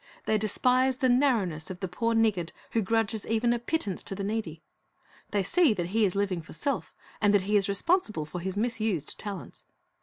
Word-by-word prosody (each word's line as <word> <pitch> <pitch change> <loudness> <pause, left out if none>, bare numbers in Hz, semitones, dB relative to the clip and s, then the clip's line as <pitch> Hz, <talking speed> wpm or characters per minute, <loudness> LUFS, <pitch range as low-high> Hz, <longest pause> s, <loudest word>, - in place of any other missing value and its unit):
They 215 - +2
despise 255 +5 +2
the 260 -2 +2
narrowness 230 - +2
of 185 -1 -7
the 190 - -3
poor 230 +6 -1
niggard 210 -7 +2 0.2
who 230 - +1
grudges 220 +1 0
even 230 +2 +2
a 240 - -1
pittance 230 - -2
to 195 - -3
the 200 - -4
needy. 195 -7 -3 0.7
They 205 -2 0
see 325 - +3
that 175 -2 -3
he 220 +2 +3
is 190 - -1
living 195 -3 0
for - - -13
self, 280 - -2 0.3
and 205 - +4
that 200 - +4
he 205 +2 0
is 200 0 +3
responsible 215 - +1
for 175 +4 -6
his 190 +2 -3
misused 220 - -1
talents. 200 -4 -7
210 Hz, 200 wpm, -28 LUFS, 190-230 Hz, 0.7 s, and